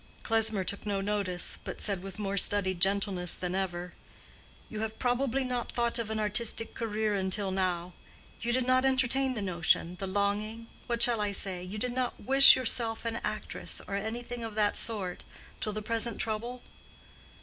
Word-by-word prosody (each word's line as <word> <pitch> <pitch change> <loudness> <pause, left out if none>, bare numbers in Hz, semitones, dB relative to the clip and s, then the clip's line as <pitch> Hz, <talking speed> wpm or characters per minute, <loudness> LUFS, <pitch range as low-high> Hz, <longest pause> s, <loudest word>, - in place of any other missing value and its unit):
Klesmer 220 -3 +2
took 200 +2 -4
no 200 -1 -1
notice, 195 -3 +2
but - - -7
said 200 -4 -1
with 195 +1 -9
more 200 -2 -3
studied 190 -2 +5
gentleness 195 -2 +3
than 180 -1 -4
ever, 180 -2 -4 0.7
"You 215 - -7
have 220 0 -5
probably 255 +1 -1
not 250 -2 -4
thought 235 0 0
of 225 -2 -4
an 220 0 -3
artistic 220 +2 0
career 215 -1 -2
until 195 0 -2
now: 180 -2 -2 0.5
you 235 - -2
did 255 0 0
not 255 0 +2
entertain 265 0 +1
the 210 - -4
notion, 175 -1 0
the 195 - -4
longing—what 215 +4 -2
shall 235 -3 +2
I 205 -1 -1
say?—you 190 0 -3
did 245 +3 -3
not 250 -1 -3
wish 270 +1 +9
yourself 230 -2 -2
an 230 0 -2
actress, - - -3
or - - -7
anything 235 +4 -5
of 225 -2 -6
that 210 -1 +1
sort, 195 -6 -2 0.4
till 215 - -2
the 215 0 -6
present 230 +1 0
trouble?" 235 +3 -4
215 Hz, 170 wpm, -29 LUFS, 195-235 Hz, 0.7 s, wish